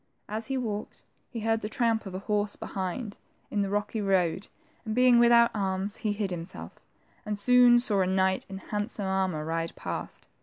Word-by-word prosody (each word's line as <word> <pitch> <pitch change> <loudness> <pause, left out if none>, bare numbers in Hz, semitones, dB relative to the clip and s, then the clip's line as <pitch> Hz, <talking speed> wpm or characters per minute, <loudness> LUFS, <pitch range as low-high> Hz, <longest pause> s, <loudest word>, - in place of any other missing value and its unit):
As 220 +2 -4
he 270 0 -1
walked, 215 -4 -4 0.3
he 230 - -6
heard 225 0 +1
the 210 - -4
tramp 225 -2 0
of 185 - -7
a 195 - -7
horse 205 -1 0
behind, 200 +3 -5 0.3
in 205 - 0
the 200 - -1
rocky 205 +2 -1
road, 190 -1 +1 0.4
and 220 -1 -3
being 250 -1 +6
without 235 0 +6
arms, 195 0 -1
he 215 -3 -1
hid 205 -2 -2
himself, 175 +1 -7 0.4
and 210 -2 -3
soon 245 +3 +6
saw 215 -5 +1
a 185 - +2
knight 190 0 +1
in 195 - -6
handsome, 205 +1 -4
armor 190 -5 -1
ride 165 +1 -2
past. - - -6
205 Hz, 185 wpm, -28 LUFS, 190-225 Hz, 0.4 s, being